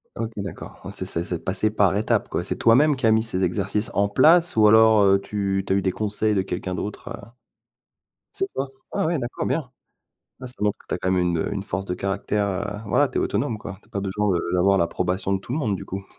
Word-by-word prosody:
OK, 115 0 -3
d'accord, 100 -4 -7
ouais, - - -6
c'est - - -4
c'est 85 - -2
c'est 85 -2 -5
passé 100 +3 0
par 100 -3 +2
étapes, 105 - +1
quoi! - - -2
C'est - - -3
toi-même 140 +6 +4
qui 130 - -2
as 110 - +5
mis 110 0 +4
ces 95 -5 -2
exercices 100 +5 -1
en 100 +1 +2
place 165 +10 +5
ou 110 -1 +6
alors 110 -3 +6
tu 100 -1 -2
tu - - +1
as - - +3
eu 100 - +2
des 95 - 0
conseils 105 +2 -1
de 100 - +2
quelqu'un 95 0 -4
d'autre, 105 +3 -6
heu? 100 - -8 1.1
C'est 390 - -1
toi? 135 0 -3 0.2
Ah - - -1
oui, 165 -1 +1
d'accord, 120 -1 -4
bien! 150 -6 -1 0.7
Ah, 130 - -7
ça 125 - -4
montre 105 -1 0
que - - -23
tu - - -1
as - - -3
quand 95 - -1
même 95 -1 +2
une, 85 -1 +1
heu, 80 - -2
une 100 -1 -3
force 95 -1 -3
de 90 - -3
caractère, 100 +2 -1
heu, 95 0 -2 0.2
voilà, 100 - +3
tu - - -3
es - - +2
autonome, 110 - -1
quoi, 100 -2 -8
tu - - -25
as - - -31
pas 100 - -3
besoin 100 +2 -1
de 85 - +1
d'avoir 95 +2 +3
l'approbation 90 +2 -1
de 95 - 0
tout 120 - -7
le 145 - 0
monde, 110 -10 0
du - - -8
coup? 95 +1 -6
100 Hz, 260 wpm, -23 LUFS, 95-110 Hz, 1.1 s, ou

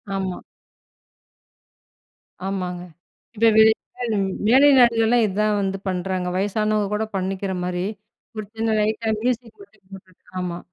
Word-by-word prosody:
ஆமா. 190 -2 -3 2.1
ஆமாங்க. 180 -2 -3 0.6
இப்போ 230 +1 +4
வெளிநாடு 220 0 +2 0.3
மேலை 270 +4 +6
நாடுகள்லாம் 235 -1 +4
இதான் 210 +1 0
வந்து 195 0 -2
பண்றாங்க. 185 0 -2
வயசானவங்க 210 +1 0
கூட 220 +1 0
பண்ணிக்கிற 190 0 -2
மாரி 180 0 -2 0.5
ஒரு 215 -1 -5
சின்ன 225 0 -1
லைட்டா 220 +1 -1
மியூஸிக் 240 - -2
மட்டும் 210 - -22
போட்டுட்டு 185 -1 -14 0.2
ஆமா. 175 -1 -4
205 Hz, 110 wpm, -22 LUFS, 190-225 Hz, 2.1 s, மேலை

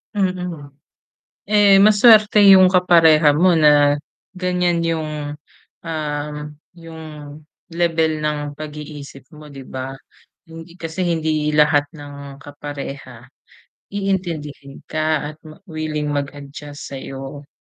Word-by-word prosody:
Mm. 180 -7 -3 0.7
Eh, 205 -1 +5
masuwerte 215 0 +6
yung 190 -1 +8
kapareha 165 -4 +5
mo 180 +2 +4
na 145 -2 +4 0.4
ganyan 180 -1 0
yung, 160 -2 -2 0.8
um, 150 -2 -4 0.4
yung 165 -2 -12 0.7
lebel 165 -2 0
ng 145 -1 -3
pag-iisip 150 -3 -9
mo, 150 -1 -13
'di 135 - -10
ba? 130 0 -6 0.6
Hindi 165 +1 -11
kasi 165 +3 -4
hindi 155 -3 0
lahat 150 -1 +4
ng 140 -2 -11
kapareha 140 -4 -9 0.6
iintindihin 170 -9 -4
ka 155 -1 -1
at - - -23
ma 155 - -13
willing 155 -2 -3
mag-adjust 145 0 -7
sayo. 135 +2 -8
155 Hz, 100 wpm, -19 LUFS, 145-170 Hz, 0.8 s, yung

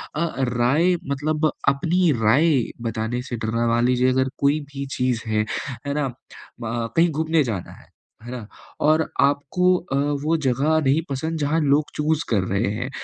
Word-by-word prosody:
अ, 170 +3 0 0.2
राय 130 +9 +2 0.2
मतलब 155 +2 0 0.2
अपनी 170 +5 +2
राय 140 +6 +4 0.3
बताने 115 +2 -2
से 120 - -2
डरना 115 +2 0
मान 120 +1 +2
लीजिए 125 0 +3
अगर 130 0 +1
कोई 140 +2 +3
भी 140 0 -4
चीज़ 125 -2 0
है, 110 -1 +1 0.4
है 140 - -1
ना, 145 -1 0 0.5
म 115 0 -2
कहीं 170 +1 +5
घूमने 160 +1 +1
जाना 105 -8 -4
है, - - -16 0.4
है 120 - -8
ना, 120 -4 -7 0.3
और 155 +1 +4 0.2
आपको 145 +6 +1
अ, 175 -6 -5 0.3
वो 160 +2 +2
जगह 140 +5 +2
नहीं 140 +4 +3
पसंद 160 +4 -3
जहाँ 150 +2 +1
लोग 145 +1 +2
चूज़ 155 +1 0
कर 105 -5 +2
रहे 100 +3 0
हैं। 125 +4 -3
140 Hz, 170 wpm, -23 LUFS, 120-155 Hz, 0.5 s, कहीं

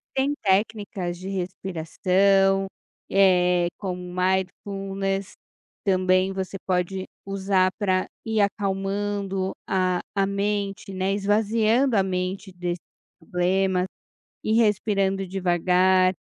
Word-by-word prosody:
Tem 270 +2 +2
técnicas 200 -3 0
de 185 +2 -7
respiração, 190 +1 +1 0.4
eh, 180 -2 +4
como 180 -3 -4
mindfulness 195 +2 -2 0.5
também 185 -1 +2
você 190 0 -4
pode 185 +1 0 0.2
usar 195 -1 +1
pra 185 -3 +1 0.2
ir 220 -1 +1
acalmando 195 -1 -1
a 185 -1 +1
a 195 -1 +2
mente, 200 0 -2
né, 190 +1 0
esvaziando 220 +5 +2
a 195 - +5
mente 190 +1 -3
desses 175 0 -3 0.4
problemas 185 +2 +1 0.6
ir 215 - +1
respirando 200 -3 +2
devagar, 185 0 +3
195 Hz, 95 wpm, -24 LUFS, 185-200 Hz, 0.6 s, a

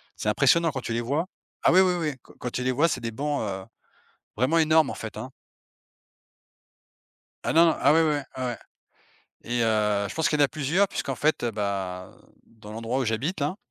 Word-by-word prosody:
c'est 105 - -2
impressionnant 155 +8 +3
quand 130 - -4
tu 115 - -4
les 115 - 0
vois. 145 +9 -1 0.4
Ah - - +5
oui 185 - +7
oui 185 -1 +3
oui, 155 -4 -1
qu - - -18
quand 125 - -4
tu 125 - -3
les 130 - +1
vois, 145 +6 +3
c'est 130 -6 -2
des 115 -1 -3
bancs, 145 +5 -2
heu, 95 -3 -4 0.7
vraiment 130 +9 +2
énormes 155 -2 +4
en - - -4
fait, 110 - -8
hein. 130 - -7 2.2
Ah - - +1
non, 165 0 +5
ah - - +5
oui 165 - +5
oui, 155 -2 +2 0.3
oui 125 -1 -1 0.9
et 120 0 -1
heu, 105 -2 +1
je - - -8
pense 160 - +1
qu'il 150 - 0
y - - +5
en - - +7
a - - +2
plusieurs 155 +8 +1
puisqu'en 135 -8 -4
fait, 155 -2 +1
heu, 120 - 0
ben, 95 -3 -4 0.3
dans 110 -2 -14
l'endroit 115 +3 -2
où - - 0
j'habite 125 - -2
là, 150 +7 -1
130 Hz, 210 wpm, -26 LUFS, 110-155 Hz, 2.2 s, oui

